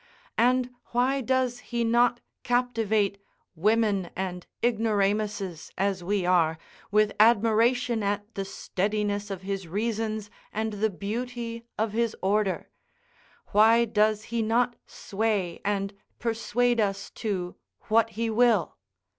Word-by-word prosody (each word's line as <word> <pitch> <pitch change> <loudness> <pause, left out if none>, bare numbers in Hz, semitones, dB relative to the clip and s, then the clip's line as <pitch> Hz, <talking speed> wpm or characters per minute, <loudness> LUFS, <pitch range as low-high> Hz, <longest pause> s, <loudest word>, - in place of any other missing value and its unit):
and 250 +1 +3 0.2
why 260 +3 +2
does 255 0 0
he 240 -1 -2
not 240 +1 +3 0.2
captivate 225 -5 +1 0.4
women 205 0 +2
and 180 -1 -4 0.2
ignoramuses, 210 -5 0
as 195 -1 0
we 195 0 0
are, 165 -3 +3 0.3
with 210 0 +3
admiration 230 +2 +4
at 205 0 -1
the 195 - -3
steadiness 205 +1 -2
of 190 -2 -5
his 195 -2 -4
reasons 215 +2 -2 0.2
and 220 0 -2
the 215 +2 +1
beauty 230 +3 -5
of 220 0 0
his 230 0 0
order? 200 0 +1 0.8
why 225 +3 +5
does 215 -1 +2
he 230 - +1
not 235 +2 +1
sway 200 -4 -2
and 200 0 -1 0.2
persuade 240 +1 0
us 200 -1 -2
to 185 -5 -3 0.3
what 225 +1 +2
he 230 0 0
will? 225 -5 +2
215 Hz, 120 wpm, -27 LUFS, 200-235 Hz, 0.8 s, why